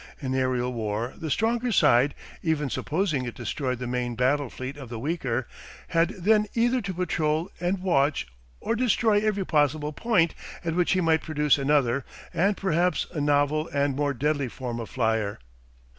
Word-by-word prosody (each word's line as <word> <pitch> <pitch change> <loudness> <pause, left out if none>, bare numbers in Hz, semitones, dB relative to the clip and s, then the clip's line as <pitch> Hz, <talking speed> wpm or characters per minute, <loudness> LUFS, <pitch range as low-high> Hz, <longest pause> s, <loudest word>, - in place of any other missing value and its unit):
In 130 -2 -3
aerial 130 -1 0
war 110 +1 -2
the 160 -2 -5
stronger 230 - +1
side, 135 - +4 0.3
even 150 -5 0
supposing 155 -6 -1
it 120 - -6
destroyed 130 -4 -2
the 125 - -5
main 120 -1 -2
battle 130 +3 +1
fleet 130 +2 -6
of 135 -4 -9
the 120 - -5
weaker, 130 -3 -2 0.4
had 165 0 +3
then 210 +3 +3
either 240 +2 +2
to 195 -1 -4
patrol 165 -1 0
and 180 +2 -1
watch 145 -5 +2 0.3
or 230 - -1
destroy 225 -3 +3
every 205 -2 0
possible 150 -1 +1
point 180 -3 +2 0.3
at 165 - 0
which 175 +2 +2
he 185 - +2
might 160 -2 +3
produce 150 -2 +2
another 140 -2 +2 0.3
and 195 +4 +2
perhaps 180 -1 +1
a 155 -4 -3
novel 145 +2 +2
and 140 -1 +1
more 145 0 0
deadly 145 +1 0
form 120 -1 -5
of 115 - -6
flyer. 110 -4 0
150 Hz, 170 wpm, -26 LUFS, 130-180 Hz, 0.4 s, side